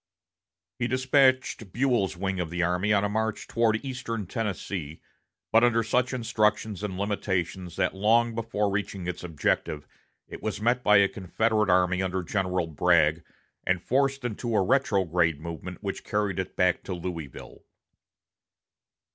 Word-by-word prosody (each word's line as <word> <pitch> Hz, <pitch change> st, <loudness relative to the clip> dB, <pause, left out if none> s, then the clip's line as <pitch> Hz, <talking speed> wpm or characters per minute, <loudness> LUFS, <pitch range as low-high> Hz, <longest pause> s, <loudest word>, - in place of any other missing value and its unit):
He 120 Hz, -, 0 dB
despatched 130 Hz, -4 st, +2 dB
Buell's 120 Hz, -7 st, +1 dB
wing 95 Hz, 0 st, -2 dB
of 85 Hz, -2 st, -2 dB
the 90 Hz, +1 st, -1 dB
army 90 Hz, +4 st, +1 dB
on 100 Hz, -1 st, +3 dB
a -, -, +2 dB
march 110 Hz, +1 st, -2 dB
toward 115 Hz, +1 st, +1 dB
eastern 115 Hz, -5 st, -4 dB
Tennessee 95 Hz, -, -4 dB, 0.5 s
but 115 Hz, +1 st, +5 dB
under 115 Hz, -1 st, +3 dB
such 125 Hz, +3 st, +1 dB
instructions 110 Hz, -4 st, 0 dB
and 100 Hz, -3 st, -4 dB
limitations 95 Hz, -3 st, -2 dB
that 95 Hz, -1 st, 0 dB
long 115 Hz, +4 st, +3 dB
before 110 Hz, -3 st, -1 dB
reaching 100 Hz, -2 st, -3 dB
its 90 Hz, 0 st, -4 dB
objective 75 Hz, -2 st, -1 dB, 0.4 s
it -, -, -9 dB
was 110 Hz, -1 st, -3 dB
met 120 Hz, +3 st, +1 dB
by 105 Hz, 0 st, +6 dB
a 100 Hz, 0 st, +5 dB
Confederate 105 Hz, 0 st, 0 dB
army 90 Hz, 0 st, +3 dB
under 95 Hz, 0 st, -1 dB
General 90 Hz, -2 st, -1 dB
Bragg, 80 Hz, 0 st, +2 dB, 0.4 s
and 95 Hz, -1 st, +1 dB
forced 135 Hz, +5 st, 0 dB
into 120 Hz, 0 st, -2 dB
a 100 Hz, -, +4 dB
retrograde 90 Hz, -, +2 dB
movement 85 Hz, +4 st, -7 dB
which 100 Hz, -1 st, -4 dB
carried 105 Hz, -3 st, -1 dB
it 95 Hz, -, -4 dB
back 90 Hz, -1 st, +2 dB
to 95 Hz, -, -3 dB
Louisville. 85 Hz, -6 st, -7 dB
100 Hz, 145 wpm, -27 LUFS, 90-115 Hz, 0.5 s, by